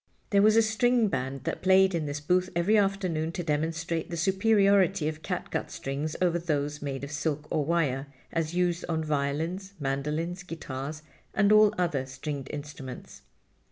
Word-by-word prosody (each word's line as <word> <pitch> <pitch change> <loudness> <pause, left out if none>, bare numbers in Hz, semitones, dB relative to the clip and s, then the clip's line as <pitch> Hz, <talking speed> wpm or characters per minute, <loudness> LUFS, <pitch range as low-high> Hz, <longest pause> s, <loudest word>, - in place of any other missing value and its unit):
There 200 -1 +5
was 215 +1 +5
a 225 - +6
string 225 +1 +2
band 130 -2 -3
that - - -3
played 190 0 +5
in 160 -3 -1
this 145 0 -3
booth 180 +5 +1
every 175 +6 +3
afternoon 190 -6 +1
to 175 - -3
demonstrate 165 +1 -1
the 170 - -4
superiority 195 -1 +3
of 155 0 -4
cat - - -4
gut - - -2
strings 140 +3 -4
over 175 -2 +2
those 150 -3 -2
made 140 -2 -4
of 140 - -5
silk 150 0 -2
or 155 - +1
wire, 145 -4 0 0.2
as 165 0 -2
used 175 -1 +1
on 160 -1 0
violins, 155 +6 -2
mandolins, 150 +6 -2
guitars 155 -3 -6 0.3
and 200 +1 +4
all 215 -1 +7
other 150 -7 0
stringed 135 +1 -5
instruments. 145 -3 -8
165 Hz, 165 wpm, -28 LUFS, 145-190 Hz, 0.3 s, all